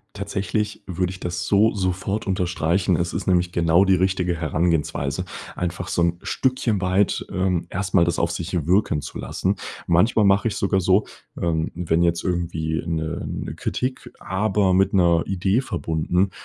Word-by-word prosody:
Tatsächlich 105 +2 -2
würde 90 0 -2
ich 95 - -10
das 90 0 -3
so 105 +2 +4
sofort 95 +2 -2
unterstreichen. 90 -1 +1
Es 85 +1 -1
ist - - -4
nämlich 90 -1 +2
genau 85 +2 +4
die 95 -1 +4
richtige 90 -1 +1
Herangehensweise 80 0 -1 0.3
einfach 90 0 -3
so 85 - 0
'n 85 0 +1
Stückchen 130 -6 0
weit, 95 +2 +1
ähm, 90 -2 0
erst 90 0 -3
mal 85 - +6
das 85 - -1
auf 85 0 +1
sich 85 -2 -3
wirken 90 -5 +2
zu - - -7
lassen. 95 +2 -1 0.3
Manchmal 105 +6 +3
mache 100 +3 +4
ich 110 - -4
sogar 95 0 +1
so, 95 +3 +3 0.3
ähm, 80 -2 0
wenn 85 -1 +1
jetzt 85 -1 +1
irgendwie 85 -3 -1
'ne 80 -1 -3
'ne - - -5
Kritik, 130 +1 -3
aber 95 0 +1
mit 95 +1 +3
'ner 85 -3 +4
Idee 95 +4 +1
verbunden, 90 -4 -1
90 Hz, 165 wpm, -23 LUFS, 85-95 Hz, 0.3 s, mal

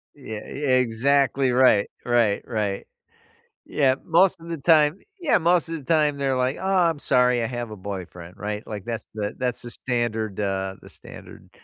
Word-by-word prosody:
Yeah, 110 -7 -7
ye 145 - -7 0.2
exactly 130 +2 +2
right, 125 -5 +4 0.2
right, 120 -4 +2
right. 105 -3 -2 0.8
Yeah, 135 -3 +2
most 180 +2 +3
of 165 - -12
the 165 - -3
time 155 +2 +4 0.2
Yeah, 335 -5 +3
most 170 0 +2
of 165 - -3
the 150 - -11
time, 150 -1 +2
they're 135 -1 0
like, 130 +1 0
"Aw, 190 -2 +2
I'm 160 -3 -4
sorry, 125 -3 +2
I 115 - -1
have 120 -2 -5
a - - -6
boyfriend," 95 -3 -8
right, 105 +1 -5
like, 105 -3 -6
that's 115 -1 -5
the 105 -1 -3
that's 125 -2 -1
the 120 - -5
standard, 115 -5 -2
uh 95 -1 -2
the - - -14
standard - - -13
125 Hz, 180 wpm, -24 LUFS, 105-150 Hz, 0.8 s, right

